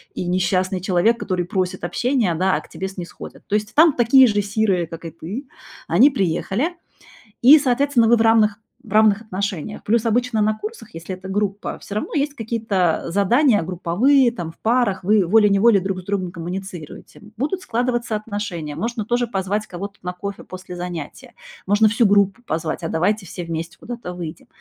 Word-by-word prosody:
и - - -3
несчастный 185 +1 0
человек, 190 +5 +2
который 180 -2 -2
просит 185 +1 -2
общения, 230 0 0
да, 185 +3 +1
а - - -2
к - - -17
тебе 190 - -5
снисходят. 180 -3 -10
То 210 - 0
есть 215 +2 -2
там 315 -1 +6
такие 250 +2 +6
же 205 -2 +1
сирые, 200 -3 0
как 165 0 -9
и 165 - -5
ты, 215 - -7 0.4
они 220 - +6
приехали, 205 - -1 0.7
и, 285 +6 +9
соответственно, 270 -3 +2
вы 235 - +6
в - - -1
равных 220 -2 +4 0.3
в 215 -6 -14
равных 215 -1 +4
отношениях. 200 -2 -4
Плюс 230 +2 +1
обычно 235 0 +1
на 215 0 +1
курсах, 425 - -9
если 165 +3 -6
это 190 +1 -10
группа, 205 0 -2
все 200 - -7
равно 215 - -3
есть 285 0 0
какие-то 220 - -1
задания 210 - +3
групповые, 215 - +2
там 170 -8 -6
в - - -30
парах, 225 -5 +1
вы 205 0 +3
волей-неволей 210 +1 +4
друг 190 -1 -3
с - - -21
другом 185 -3 -2
коммуницируете. 175 -1 -8 0.2
Будут 300 - -2
складываться 240 -4 -1
отношения, 205 -8 -4
можно 225 +4 -3
тоже 240 +2 0
позвать 205 0 -2
кого-то 200 +3 -7
на 180 - -4
кофе 200 +2 -7
после 185 -1 -9
занятия, 175 -4 -7 0.3
можно 205 +2 +4
всю 225 +1 +3
группу 200 +2 +3
позвать: 165 -2 -3
"А - - -2
давайте 185 +5 0
все 175 - -7
вместе 165 +1 -5
куда-то 235 -6 -7
выйдем!". 170 -2 -8
205 Hz, 180 wpm, -21 LUFS, 180-230 Hz, 0.7 s, и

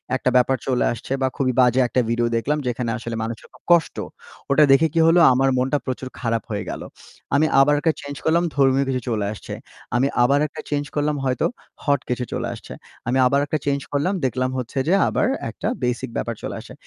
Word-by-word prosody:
একটা 130 - 0
ব্যাপার 130 +1 +3
চলে 125 -2 +1
আসছে 120 - -10
বা 130 - +3
খুবই 130 -2 0
বাজে 125 +1 +4
একটা 125 +2 +1
ভিডিও 120 0 +1
দেখলাম 145 +6 0
যেখানে 120 -1 -2
আসলে 115 0 -5
মানুষের 115 0 -6
খুব - - -20
কষ্ট, 170 -2 +4 0.6
ওটা 150 +2 +6
দেখে 155 +4 +5
কী 165 - +2
হলো? 170 +1 +5
আমার 135 +1 +2
মনটা 130 +3 +1
প্রচুর 130 0 -4
খারাপ 115 -1 -1
হয়ে 105 - -2
গেল। - - -5 0.5
আমি 155 +2 +4
আবার 145 +2 +5
একা 160 - +3
চেঞ্জ 145 0 -7
করলাম, 170 +2 +3
ধর্মীয় 135 0 +3
কিছু 130 -1 -1
চলে 105 -3 -1
আসছে। - - -9 0.4
আমি 130 +3 +3 0.2
আবার 140 +3 +3
একটা - - -9
চেঞ্জ 145 -1 -1
করলাম 150 0 +1
হয়তো, 130 -2 0 0.4
হট 140 -3 +2
কিছু 125 0 -1
চলে - - -2
আসছে। - - -10 0.3
আমি 130 +2 +1
আবার 140 +3 +3
একটা 155 - -1
চেঞ্জ 140 0 0
করলাম, 170 +8 +1
দেখলাম 130 +1 0
হচ্ছে 125 +2 -5
যে 180 - +3
আবার - - +1 0.2
একটা - - -5 0.2
বেসিক 125 +1 -1
ব্যাপার 115 -1 -2
চলে - - -4
আসছে। - - -11
130 Hz, 205 wpm, -22 LUFS, 125-145 Hz, 0.6 s, ওটা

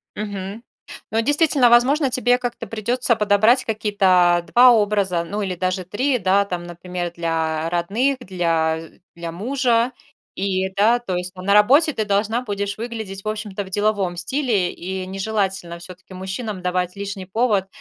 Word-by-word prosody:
Мгм. 205 +1 -6 0.5
Ну, 225 +1 +2
действительно, 290 -2 +3
возможно, 265 +4 +4
тебе 245 0 +2
как-то 245 -1 -5
придётся 235 +2 0
подобрать 215 +4 +3
какие-то 185 -5 +2
2 250 +1 +7
образа, 200 -6 +1
ну, 205 +5 -4
или 190 -3 -2
даже 185 0 -2
3, 250 +7 0
да, 195 +1 +2
там, 180 -3 -4
например, 175 0 -5
для 165 -1 -1
родных, 210 +11 0
для 165 -5 -1 0.3
для 170 -1 -6
мужа. 240 +4 +1 0.4
И 190 -1 -1
да, 220 +4 +4
то 195 -7 -4
есть 180 +1 -4
там 185 0 -10
на 200 - +3
работе 280 +10 +5
ты 220 - -2
должна 210 +3 0
будешь 200 -3 -3
выглядеть, 220 -4 -6
в - - -7
общем-то, 210 -2 -4
в 190 - -12
деловом 205 -3 0
стиле, 205 -2 0
и 185 +1 -5
нежелательно 190 -2 -3
всё-таки 185 +1 -12
мужчинам 190 +1 -5
давать 180 +1 -1
лишний 200 -1 -6
повод, 205 -2 +1
200 Hz, 155 wpm, -21 LUFS, 180-230 Hz, 0.5 s, 2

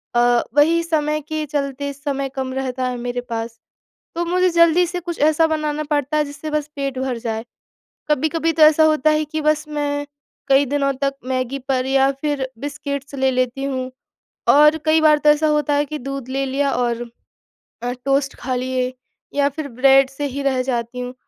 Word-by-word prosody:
अ, 240 0 +4
वही 330 +3 +4
समय 305 -2 0
के 310 +1 -4
चलते 280 -1 -3
समय 275 -1 -3
कम 260 -1 -3
रहता 260 -1 -2
है 250 - -3
मेरे 245 0 -3
पास, 230 -1 -5 0.6
तो 345 +1 -1
मुझे 365 +2 +2
जल्दी 335 +1 +4
से 355 +1 -4
कुछ 345 -1 -6
ऐसा 310 +2 +4
बनाना 305 -1 -2
पड़ता 290 0 0
है 300 - +3
जिससे 290 +2 -7
बस 300 -1 -1
पेट 275 -2 -3
भर 260 -2 -2
जाए। 225 -1 -4 0.7
कभी-कभी 315 +3 +1
तो 320 0 +1
ऐसा 310 +1 +7
होता 310 -1 +3
है 305 0 +1
कि 310 +1 -4
बस 305 0 +1
मैं 290 -1 -2 0.4
कई 275 +1 +5
दिनों 275 0 0
तक 275 0 +1
मैगी 255 +1 -2
पर 260 -1 +1
या 270 0 +3
फिर 290 -3 -1
बिस्किट्स 280 0 -5
ले 265 -1 +2
लेती 255 +1 -1
हूँ 260 -2 -3 0.6
और 300 +2 +6
कई 315 0 +4
बार 305 -1 +6
तो 300 0 +3
ऐसा 300 +1 +4
होता 300 -1 +1
है 290 +1 +2
कि 300 +1 -6
दूध 275 -1 -6
ले 270 +1 -1
लिया 275 +1 0
और 240 -1 -1 0.8
अ, 245 0 -2
टोस्ट 275 0 +1
खा 255 0 -2
लिए 255 0 -1 0.4
या 285 0 +3
फिर 285 +1 -6
ब्रेड 270 +2 +4
से 285 +2 -4
ही 280 - -2
रह 260 -2 +1
जाती 245 -1 -3
हूँ 250 +1 -5
280 Hz, 190 wpm, -20 LUFS, 260-305 Hz, 0.8 s, ऐसा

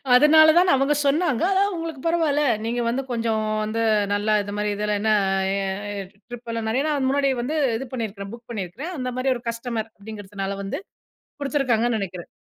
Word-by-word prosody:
அதனால 315 +4 +7
தான் 360 +1 +5
அவங்க 275 +2 +3
சொன்னாங்க 290 -2 +2
"அதான் 395 +1 +2
உங்களுக்கு 330 -3 -5
பரவாயில்ல. 320 -4 +2 0.2
நீங்க 240 +1 -1
வந்து 250 +3 0
கொஞ்சம் 230 -2 0 0.2
வந்து 220 +2 -2 0.3
நல்லா 205 +1 +1
இது 205 - -6
மாதிரி 210 0 0
இதில 210 0 -1
என்ன 215 0 +3 1.1
ட்ரிப் 245 -1 -9
எல்லாம் 230 -1 -3
நிறைய 255 +5 +1
நாள் 285 -3 +1
முன்னாடி 275 +1 +2
வந்து 280 +6 -2 0.2
இது 265 +3 -6
பண்ணியிருக்கிறேன், 205 -5 -5
புக் 235 0 -12
பண்ணியிருக்கிறேன். 230 - -5
அந்த 255 -1 -3
மாதிரி 260 +1 +1
ஒரு 240 - -7
கஸ்டமர் 230 -1 -4
அப்படிங்கிறதுனால 200 -2 -6
வந்து 195 - -4 0.6
குடுத்துருக்காங்கன்னு 245 -5 +1
நெனைக்கிறேன்." 185 -3 -6
240 Hz, 165 wpm, -23 LUFS, 215-280 Hz, 1.1 s, அதனால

